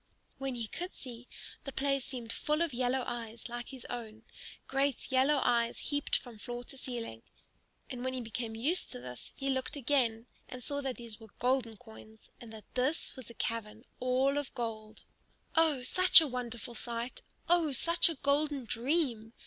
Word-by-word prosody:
When 270 -2 -2
he 235 -1 -2
could 355 +11 -5
see, 245 -2 -8 0.4
the 275 - -5
place 275 0 +1
seemed 240 -4 -5
full 300 +2 +1
of 330 -5 -2
yellow 250 +1 +1
eyes 230 -1 -5
like 240 0 -5
his 260 -3 -9
own, 225 -2 -6 0.4
great 270 -1 0
yellow 270 +3 +4
eyes 235 -1 +2
heaped 290 -1 0
up - - -8
from 235 -4 -11
floor 240 +2 -5
to 270 - -9
ceiling. 230 - -4 0.7
And 250 -2 -5
when 260 0 -1
he 255 - -2
became 225 0 -4
used 295 +11 +2
to - - -6
this 125 0 -8
he 275 0 -1
looked 260 +2 -1
again 245 -5 +2 0.2
and 250 -1 -7
saw 285 +3 -1
that 265 -2 -3
these 230 -2 -8
were 220 - -12
golden 245 -3 +1
coins, 220 -1 -14
and 235 -2 -9
that 220 -1 -10
this 265 +6 0
was 260 -5 -9
a 235 - -11
cavern 225 +1 -3
all 260 +3 +3
of 290 - -5
gold. 220 -2 -4 0.5
Oh, 315 -6 +4
such 370 +9 +9
a 320 - +2
wonderful 245 -3 -4
sight! 235 +1 -4 0.3
Oh, 340 -3 +4
such 335 +7 +4
a 330 - -2
golden 285 -1 +1
dream! 235 -2 0
250 Hz, 180 wpm, -33 LUFS, 230-275 Hz, 0.7 s, such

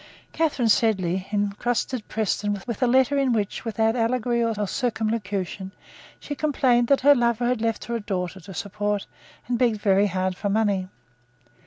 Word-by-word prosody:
Catharine 295 -7 +1
Sedley 190 -5 +1
entrusted 215 +3 -1
Preston 205 -1 -1
with 235 -4 -5
a 250 - +4
letter 265 +3 +3
in 265 -3 +2
which, 210 -3 -2
without 225 0 +1
allegory 235 0 +1
or 220 -2 -1
circumlocution, 210 -5 -2 0.5
she 290 - -5
complained 260 -5 +2
that 275 +1 +3
her 285 +2 +7
lover 240 -2 +1
had 245 -2 0
left 225 -1 -1
her 235 - -3
a - - -6
daughter 190 -2 -3
to 190 +2 -11
support, 205 +2 -2 0.4
and 240 -1 -1
begged 230 -4 +2
very 200 0 +3
hard 185 -1 -1
for 200 +2 -3
money. 200 -3 +1
220 Hz, 160 wpm, -24 LUFS, 200-240 Hz, 0.5 s, her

